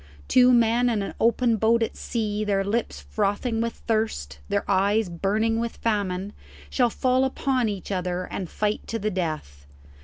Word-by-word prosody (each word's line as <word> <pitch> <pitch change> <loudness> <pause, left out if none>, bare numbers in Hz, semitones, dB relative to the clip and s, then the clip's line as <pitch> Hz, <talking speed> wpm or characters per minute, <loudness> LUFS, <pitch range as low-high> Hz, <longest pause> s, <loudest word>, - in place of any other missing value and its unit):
Two 250 0 +6
men 240 0 +4
in 215 -4 0
an - - -5
open 235 0 +3
boat 225 +2 +3
at - - -3
sea, 215 -3 -2
their 200 -2 +1
lips 215 +4 -2
frothing 220 +3 -1
with 230 0 -1
thirst, 215 - -2
their 200 - 0
eyes 200 +1 +2
burning 215 +6 0
with 235 0 -3
famine, 200 -3 -1 0.4
shall 245 -2 +3
fall 255 +3 +1
upon 260 -2 0
each 200 -1 -5
other 180 -1 -1
and 180 -1 -5
fight 210 0 -2
to 225 - -2
the 215 0 -2
death. 155 - -4
215 Hz, 165 wpm, -25 LUFS, 195-230 Hz, 0.4 s, Two